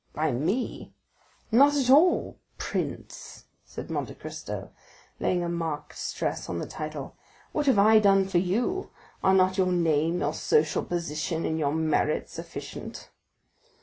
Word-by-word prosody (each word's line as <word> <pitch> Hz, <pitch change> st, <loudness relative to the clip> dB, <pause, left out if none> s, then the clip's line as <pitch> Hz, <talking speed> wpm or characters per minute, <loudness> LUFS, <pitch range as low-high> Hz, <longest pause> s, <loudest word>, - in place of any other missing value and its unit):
"By 155 Hz, +1 st, +1 dB
me? 170 Hz, -, -2 dB, 0.6 s
Not 280 Hz, +6 st, +6 dB
at 260 Hz, -2 st, +2 dB
all, 325 Hz, +6 st, +4 dB, 0.2 s
prince," -, -, -5 dB, 0.2 s
said -, -, -8 dB
Monte -, -, -3 dB
Cristo -, -, -7 dB, 0.5 s
laying 175 Hz, -1 st, +1 dB
a -, -, -2 dB
marked 165 Hz, -3 st, -4 dB
stress -, -, -3 dB
on 85 Hz, -, -2 dB
the -, -, -3 dB
title, 155 Hz, -3 st, -6 dB, 0.4 s
"what 295 Hz, -1 st, -1 dB
have 265 Hz, -, +5 dB
I 215 Hz, +2 st, +7 dB
done 195 Hz, -2 st, +4 dB
for 185 Hz, -2 st, +2 dB
you? 235 Hz, -, -1 dB, 0.3 s
Are 190 Hz, -, +5 dB
not 185 Hz, +1 st, +3 dB
your 185 Hz, -1 st, +3 dB
name, 165 Hz, -1 st, +1 dB
your 145 Hz, +1 st, 0 dB
social 155 Hz, 0 st, +1 dB
position, 165 Hz, -1 st, -2 dB
and 160 Hz, 0 st, -1 dB
your 145 Hz, -1 st, 0 dB
merit 155 Hz, -1 st, 0 dB
sufficient?" -, -, -8 dB
175 Hz, 145 wpm, -27 LUFS, 155-205 Hz, 0.6 s, I